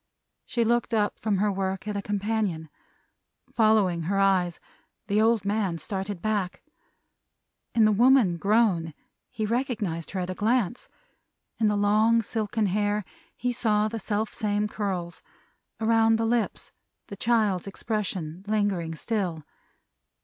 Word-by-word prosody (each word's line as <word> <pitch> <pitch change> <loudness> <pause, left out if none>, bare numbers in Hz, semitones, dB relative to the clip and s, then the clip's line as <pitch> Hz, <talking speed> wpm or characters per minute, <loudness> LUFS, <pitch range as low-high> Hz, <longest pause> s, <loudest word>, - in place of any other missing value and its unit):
She 235 - 0
looked 235 0 +1
up 210 -1 0
from 210 -3 0
her 205 +2 +2
work, 190 0 -3
at 210 - -2
a 200 - -1
companion. 205 -5 -2 0.8
Following 215 -6 +3
her 195 +3 0
eyes, 185 -3 +2 0.5
the 210 +1 +2
old 225 -2 +2
man 200 -4 0
started 195 +1 -4
back. 205 -4 -1 1.1
In 225 -2 +5
the 215 - +5
woman 230 -4 +4
grown, 195 -6 +2 0.3
he 215 - -3
recognized 210 - -2
her 190 - -3
at 180 - -4
a - - -2
glance. 235 +3 0 0.7
In 220 - +3
the 210 -1 +1
long 215 +3 +3
silken 220 0 -1
hair, 205 +1 0 0.3
he 245 0 -1
saw 215 -3 +1
the 225 +1 -4
self 210 +1 -2
same 210 0 0
curls; 190 -5 -4 0.6
around 225 0 +4
the 225 0 0
lips, 230 -1 -1 0.3
the 200 - -8
child's 210 -4 +1
expression 190 -5 -4
lingering 200 -6 0
still. 175 -5 -3
210 Hz, 135 wpm, -26 LUFS, 190-225 Hz, 1.1 s, In